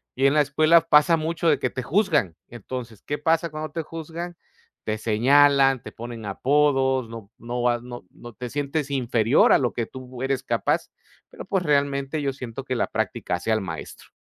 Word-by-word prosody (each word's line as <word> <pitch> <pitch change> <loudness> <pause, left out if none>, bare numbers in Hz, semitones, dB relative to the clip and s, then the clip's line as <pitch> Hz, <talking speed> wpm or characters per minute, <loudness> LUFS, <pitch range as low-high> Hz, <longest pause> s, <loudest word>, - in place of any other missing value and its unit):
Y 135 - +1
en 140 - +5
la 150 - +3
escuela 155 +4 +4
pasa 165 +1 +4
mucho 165 +1 -1
de 150 - +3
que 130 - 0
te 130 - -5
juzgan. 150 - +1
Entonces, 120 -1 -8
¿qué 145 - -4
pasa 165 +2 +1
cuando 155 0 -6
te 165 - -2
juzgan? 165 +2 -7 0.5
Te 110 0 -2
señalan, 135 +4 +4
te - - -9
ponen 115 -1 -8
apodos, 135 +3 +1
no 115 -3 -9
no 120 +1 -4
vas, 120 -1 +1
no 120 0 -9
no, 120 -1 -13
te 125 +2 -7
sientes 145 +2 -2
inferior 125 -2 +3
a - - +5
lo 125 -3 -1
que 115 - -2
tú 130 +1 -9
eres 135 -1 0
capaz. - - -1 0.4
Pero, - - -10
pues, 190 -2 -1
realmente 140 -1 0
yo 140 -1 -1
siento 130 -1 -7
que 130 -1 -3
la - - 0
práctica - - -2
hace 90 +6 -3
al 110 0 +2
maestro. 85 -5 -8
135 Hz, 195 wpm, -24 LUFS, 120-150 Hz, 0.5 s, en